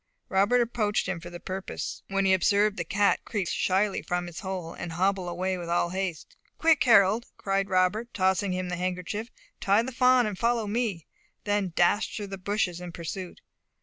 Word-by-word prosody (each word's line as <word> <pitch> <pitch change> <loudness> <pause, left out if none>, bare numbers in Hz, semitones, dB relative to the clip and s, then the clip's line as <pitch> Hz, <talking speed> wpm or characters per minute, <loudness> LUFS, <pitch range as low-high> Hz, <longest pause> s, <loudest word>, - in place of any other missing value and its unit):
Robert 205 +4 +3
approached 220 -3 0
him 170 - -2
for 175 - -9
the 175 0 -9
purpose, 190 +2 -5
when 195 0 0
he 190 - +5
observed 200 +3 +3
the 170 - -2
cat 200 +4 +1
creep 200 -6 -2
slyly 195 +4 +1
from 180 -1 -2
his 175 -1 -8
hole, 185 -4 -5
and 170 -1 -6
hobble 185 +1 0
away 185 +1 -2
with 170 -1 -6
all 175 0 +1
haste. 185 -3 -4 0.2
"Quick, 320 -4 +4
Harold," 215 -1 +5
cried 195 0 -1
Robert, 190 +6 +1
tossing 190 0 +1
him 185 0 -2
the 180 - -3
handkerchief, 185 +5 -3 0.3
"tie 200 +3 +3
the 260 - -5
fawn, 250 0 +4
and 205 -3 -4
follow 235 -1 +1
me," 205 -6 -2 0.4
then 205 -3 0
dashed 190 +5 +2
through 210 - -4
the 195 -1 -7
bushes 185 -3 -1
in 180 -1 -7
pursuit. 175 +2 -7
195 Hz, 185 wpm, -27 LUFS, 180-210 Hz, 0.4 s, he